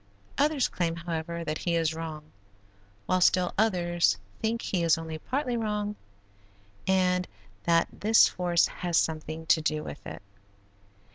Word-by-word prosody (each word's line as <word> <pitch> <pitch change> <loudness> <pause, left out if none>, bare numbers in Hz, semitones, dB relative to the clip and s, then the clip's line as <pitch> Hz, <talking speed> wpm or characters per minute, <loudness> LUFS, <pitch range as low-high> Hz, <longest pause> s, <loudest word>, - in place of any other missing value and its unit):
Others 290 -1 +3
claim, 170 -2 -2
however, 170 0 -4
that 155 -1 -3
he 170 -1 0
is 165 -1 +1
wrong, 155 -2 -7 0.7
while 185 0 +1
still 180 0 +3
others 175 - +2 0.2
think 230 +1 -1
he 185 - -1
is 165 -1 +4
only 160 -1 -6
partly 255 - -2
wrong 210 -2 -2 0.9
and 180 -1 +2 0.4
that 170 -1 +3
this 220 +2 +6
force 175 -2 +2
has 175 -2 -2
something 160 0 -1
to 160 - +4
do 155 0 -1
with - - -8
it. - - -8
175 Hz, 140 wpm, -28 LUFS, 160-190 Hz, 0.9 s, this